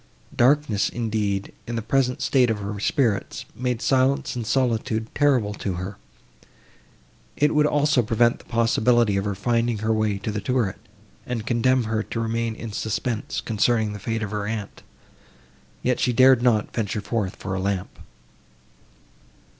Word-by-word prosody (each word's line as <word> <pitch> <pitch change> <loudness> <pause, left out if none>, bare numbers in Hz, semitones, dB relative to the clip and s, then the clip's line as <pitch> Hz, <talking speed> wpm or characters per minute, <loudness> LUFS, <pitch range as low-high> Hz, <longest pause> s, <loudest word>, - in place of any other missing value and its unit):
Darkness, 125 -4 +3
indeed, 105 -4 -2
in 120 - -3
the 115 - -2
present 125 +2 0
state 130 -4 +3
of 110 - 0
her 100 0 -5
spirits, 110 -1 0
made 125 -1 -2
silence 135 0 +2
and 120 -3 -4
solitude 115 -2 0
terrible 130 -8 +2
to 100 -2 -3
her; 90 +3 -5 1.4
it 150 +1 +3
would 150 0 +4
also 145 -3 +3
prevent 115 +1 +2
the - - -17
possibility 115 -1 +2
of 100 +1 -1
her 100 -1 -2
finding 115 +2 0
her 110 +1 0
way 110 -2 0
to 100 +2 -4
the 105 0 -3
turret, 105 -3 -1 0.5
and 115 -3 -3
condemn 125 +2 +2
her 110 0 -1
to 115 - -5
remain 115 0 -1
in 115 -1 -7
suspense, 110 +2 -3
concerning 110 -1 +1
the 105 - -7
fate 115 +2 -2
of 105 - -4
her 105 -1 -3
aunt; 110 -2 -5 1.0
yet 125 0 +1
she 125 - +2
dared 130 0 +6
not 115 -4 +3
to - - -26
venture 105 -1 -2
forth 105 -3 -2
for 95 - -5
a 95 - -2
lamp. 95 -1 -3
115 Hz, 160 wpm, -24 LUFS, 105-125 Hz, 1.4 s, dared